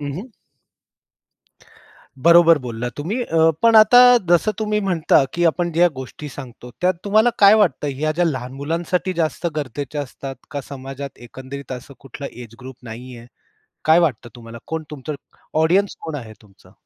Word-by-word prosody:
हं, 145 Hz, -1 st, -4 dB
हं. 205 Hz, +10 st, -7 dB, 1.9 s
बरोबर 170 Hz, -1 st, +6 dB
बोलला 120 Hz, 0 st, -4 dB
तुम्ही 190 Hz, -, -3 dB
अ, 165 Hz, -6 st, +3 dB
पण 230 Hz, -1 st, +5 dB
आता 215 Hz, +3 st, +7 dB, 0.3 s
जसं 175 Hz, +5 st, +3 dB
तुम्ही 210 Hz, -1 st, 0 dB
म्हणता, 175 Hz, -7 st, +2 dB
की 175 Hz, -, 0 dB
आपण 170 Hz, +1 st, +1 dB
ज्या 175 Hz, +2 st, +4 dB
गोष्टी 130 Hz, +3 st, -8 dB
सांगतो, 125 Hz, -2 st, -11 dB
त्यात 185 Hz, +1 st, +2 dB
तुम्हाला 215 Hz, +4 st, +3 dB
काय 200 Hz, +1 st, +7 dB
वाटतं? 205 Hz, -8 st, +2 dB
ह्या 155 Hz, +3 st, -1 dB
ज्या 175 Hz, +3 st, +1 dB
लहान 130 Hz, -6 st, -3 dB
मुलांसाठी 170 Hz, +5 st, -2 dB
जास्त 165 Hz, 0 st, -2 dB
गरजेच्या 145 Hz, +1 st, -4 dB
असतात 135 Hz, 0 st, -8 dB, 0.2 s
का? 145 Hz, -2 st, -4 dB
समाजात 135 Hz, 0 st, -8 dB
एकंदरीत 130 Hz, +2 st, -9 dB
असं 130 Hz, +2 st, -9 dB
कुठलं 135 Hz, +1 st, -8 dB
एज 120 Hz, -2 st, -11 dB
ग्रुप 130 Hz, 0 st, -10 dB
नाहीये. 120 Hz, +1 st, -10 dB, 0.6 s
काय 160 Hz, +2 st, +5 dB
वाटतं 130 Hz, -8 st, 0 dB
तुम्हाला? 115 Hz, -1 st, -11 dB
कोण 160 Hz, 0 st, -4 dB
तुमचं 150 Hz, +1 st, -6 dB, 0.5 s
ऑडियन्स 190 Hz, +5 st, +2 dB
कोण 160 Hz, -, -6 dB
आहे 115 Hz, -5 st, -9 dB
तुमचं? 100 Hz, -3 st, -22 dB
150 Hz, 155 wpm, -20 LUFS, 130-175 Hz, 1.9 s, आता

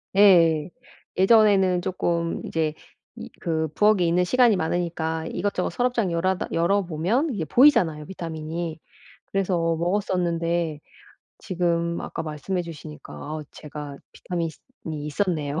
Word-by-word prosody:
예. 170 Hz, -6 st, +5 dB, 0.5 s
예전에는 190 Hz, -3 st, +5 dB
조금 170 Hz, -2 st, -1 dB
이제 160 Hz, -2 st, -1 dB, 0.4 s
이 -, -, -8 dB
그 160 Hz, -1 st, -1 dB
부엌에 210 Hz, -3 st, +4 dB
있는 175 Hz, +2 st, +2 dB
시간이 240 Hz, 0 st, +4 dB
많으니까 160 Hz, -1 st, -2 dB
이것저것 195 Hz, 0 st, -1 dB
서랍장 245 Hz, -6 st, 0 dB
열아다 180 Hz, +2 st, 0 dB
열어보면 190 Hz, -, +1 dB
이게 175 Hz, -7 st, -3 dB
보이잖아요, 165 Hz, -, +4 dB
비타민이. 165 Hz, -2 st, -5 dB, 0.5 s
그래서 195 Hz, -2 st, 0 dB, 0.2 s
먹었었는데 170 Hz, -3 st, 0 dB, 0.6 s
지금 170 Hz, -3 st, -1 dB
아까 -, -, -5 dB
말씀해 155 Hz, +4 st, -3 dB
주시니까 155 Hz, -2 st, -10 dB
아 155 Hz, +1 st, -6 dB
제가 150 Hz, -2 st, -8 dB, 0.2 s
비타민이 170 Hz, -2 st, -3 dB, 0.4 s
있었네요. 150 Hz, 0 st, -2 dB
170 Hz, 300 characters per minute, -24 LUFS, 160-190 Hz, 0.6 s, 예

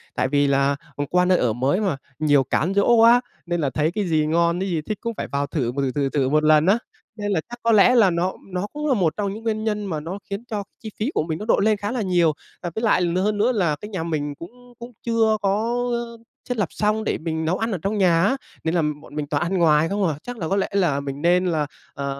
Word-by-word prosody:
Tại -, -, +1 dB
vì 145 Hz, +1 st, +2 dB
là, 140 Hz, 0 st, +2 dB, 0.2 s
ờ, 145 Hz, -, -2 dB
qua 180 Hz, 0 st, +3 dB
nơi 180 Hz, 0 st, +4 dB
ở 120 Hz, -3 st, +1 dB
mới 135 Hz, -, 0 dB
mà, 190 Hz, -9 st, 0 dB, 0.2 s
nhiều 145 Hz, -3 st, +4 dB
cám 155 Hz, +7 st, 0 dB
dỗ 200 Hz, +4 st, +4 dB
quá 230 Hz, +2 st, +6 dB, 0.2 s
nên 175 Hz, -1 st, -1 dB
là 140 Hz, -, +1 dB
thấy 150 Hz, +4 st, 0 dB
cái 205 Hz, +2 st, -2 dB
gì 155 Hz, -2 st, +2 dB
ngon, 170 Hz, +2 st, +1 dB
cái 195 Hz, +1 st, -2 dB
gì 165 Hz, -3 st, -1 dB
thích 210 Hz, +7 st, -4 dB
cũng 230 Hz, 0 st, -3 dB
phải -, -, -3 dB
vào 140 Hz, 0 st, -2 dB
thử, 130 Hz, -7 st, -1 dB
thử, 135 Hz, -2 st, 0 dB
thử, 140 Hz, +1 st, -1 dB
thử 135 Hz, -2 st, 0 dB
một 155 Hz, +2 st, +2 dB
lần 155 Hz, 0 st, +5 dB
á, 195 Hz, +4 st, +4 dB, 0.4 s
nên 205 Hz, -2 st, -3 dB
là 185 Hz, -, +1 dB
chắc 240 Hz, 0 st, -8 dB
có 230 Hz, -, +3 dB
lẽ 225 Hz, +3 st, +6 dB
là 220 Hz, -5 st, +6 dB
nó 175 Hz, +2 st, 0 dB, 0.2 s
nó 180 Hz, +2 st, -2 dB
cũng 300 Hz, +1 st, -3 dB
là 280 Hz, -, +3 dB
một 175 Hz, -9 st, +1 dB
trong 200 Hz, -2 st, -1 dB
những 220 Hz, +2 st, -9 dB
nguyên 215 Hz, -1 st, -1 dB
nhân 210 Hz, -1 st, -1 dB
mà 165 Hz, -6 st, -3 dB
nó 170 Hz, +6 st, -6 dB
khiến 200 Hz, +3 st, -4 dB
cho 210 Hz, -3 st, -3 dB, 0.2 s
chi 220 Hz, -, -7 dB
phí 225 Hz, +7 st, -1 dB
của -, -, +1 dB
mình 160 Hz, 0 st, -4 dB
nó 210 Hz, -, -5 dB
độn 220 Hz, -, +2 dB
lên 215 Hz, -1 st, +3 dB
khá 205 Hz, +2 st, -3 dB
là 245 Hz, -1 st, -2 dB
nhiều. 175 Hz, -5 st, +2 dB, 0.3 s
Và 175 Hz, -, -2 dB
với 220 Hz, -, -3 dB
lại 215 Hz, -5 st, +3 dB
l 175 Hz, 0 st, 0 dB
hơn 205 Hz, +3 st, +1 dB
nữa 220 Hz, +5 st, +3 dB
là 180 Hz, -10 st, +1 dB
cái 210 Hz, -, -7 dB
nhà 185 Hz, -6 st, -3 dB
mình 150 Hz, -3 st, -3 dB
cũng 245 Hz, -, -13 dB
cũng 235 Hz, +1 st, -9 dB
chưa 225 Hz, -2 st, +2 dB
có, 215 Hz, +4 st, 0 dB, 0.2 s
ờ, 235 Hz, -1 st, -4 dB, 0.3 s
thiết 250 Hz, -, -1 dB
lập 205 Hz, -5 st, +1 dB
xong 215 Hz, +1 st, 0 dB
để -, -, -1 dB
mình 160 Hz, -1 st, -3 dB
nấu 175 Hz, +4 st, 0 dB
ăn 225 Hz, +1 st, -2 dB
ở 190 Hz, -, -1 dB
trong 200 Hz, +4 st, -1 dB
nhà 175 Hz, -4 st, +3 dB
á, 260 Hz, +8 st, +2 dB, 0.3 s
nên 160 Hz, +2 st, 0 dB
là 170 Hz, -, +3 dB, 0.2 s
bọn 150 Hz, -, -14 dB
mình 150 Hz, -1 st, -3 dB
toàn 145 Hz, +1 st, 0 dB
ăn 185 Hz, +2 st, -1 dB
ngoài 160 Hz, -2 st, +4 dB
không 200 Hz, -1 st, 0 dB
à. 155 Hz, -, -1 dB
Chắc 245 Hz, 0 st, -7 dB
là 165 Hz, -, -3 dB
có 195 Hz, -, 0 dB
lẽ 195 Hz, -, +1 dB
là 175 Hz, -8 st, +2 dB
mình 140 Hz, 0 st, -6 dB
nên 180 Hz, +2 st, +3 dB
là, 155 Hz, -4 st, 0 dB, 0.3 s
à, 140 Hz, -, -4 dB
180 Hz, 285 wpm, -22 LUFS, 155-215 Hz, 0.4 s, quá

